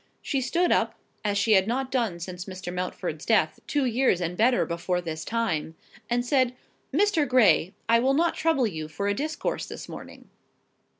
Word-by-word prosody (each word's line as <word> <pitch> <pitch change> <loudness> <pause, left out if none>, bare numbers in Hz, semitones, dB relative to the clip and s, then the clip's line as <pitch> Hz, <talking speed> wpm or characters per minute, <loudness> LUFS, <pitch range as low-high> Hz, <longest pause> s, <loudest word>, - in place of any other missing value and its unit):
She 275 - -1
stood 345 +7 +1
up, - - +2 0.3
as 205 -1 0
she 210 +2 +2
had 190 -1 +5
not 260 +2 -1
done 230 -10 0
since 180 +1 -6
Mr. 185 -2 -7
Mountford's 180 0 -4
death, - - +2
two 290 -2 +1
years 245 -6 +2
and 175 0 -2
better 245 +5 +3
before 175 +1 -1
this 160 -2 -5
time, 195 -9 -2 0.3
and 245 0 +1
said— 255 -1 +2 0.4
"Mr. 325 -2 +2
Gray, 200 -9 +4
I 230 0 +5
will 265 +3 +2
not 335 +3 +2
trouble 320 -6 +1
you 160 -7 -4
for 180 +6 -3
a 205 - +2
discourse 305 +9 -3
this - - -8
morning." - - -11
230 Hz, 180 wpm, -26 LUFS, 180-260 Hz, 0.4 s, had